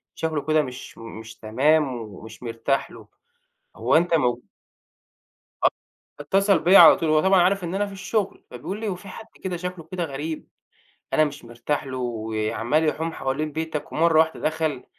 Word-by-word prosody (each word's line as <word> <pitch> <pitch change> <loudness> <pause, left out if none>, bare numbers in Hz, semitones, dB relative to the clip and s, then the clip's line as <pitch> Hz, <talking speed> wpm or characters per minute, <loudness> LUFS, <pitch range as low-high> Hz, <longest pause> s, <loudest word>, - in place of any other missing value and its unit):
شكله 160 -2 -2
كده 155 0 +3
مش 130 -2 -8
مُ - - -12 0.2
مش 110 0 -10
تمام، 140 +7 +2
ومش 110 +1 -10
مرتاح 120 +8 -1
له - - -13 0.7
هو - - +1
أنت 170 +1 +1
موجو" 125 -6 +2 1.2
آه، - - +8 0.5
فاتصل 195 +5 +2
بيّا 185 +5 +7
على - - +10
طول 165 -3 -1
هو 155 0 +4
طبعًا 190 -1 +5
عارف 190 +2 +2
إن 175 +2 -3
أنا 205 +1 +1
في 200 - -9
الشُغل 195 +1 -2
فبيقول 130 - -6
لي: 220 - -3
"هو 190 - -1
في 195 - -13
حد 220 +4 -9 0.2
كده 180 -2 -2
شكله 180 -2 -6
كده 180 -2 -2
غريب، 155 +2 -5 0.7
أنا 155 - +5
مش 145 -3 -6
مرتاح 120 +6 -3
له 130 -1 -5
وعَمّال 115 +4 -1
يحوم 160 +2 -2
حوالين 145 +3 -2
بيتك 160 -1 -4
ومرّة 165 0 +3
واحدة 160 0 +2
دخل 155 -4 -1
155 Hz, 175 wpm, -24 LUFS, 130-175 Hz, 1.2 s, على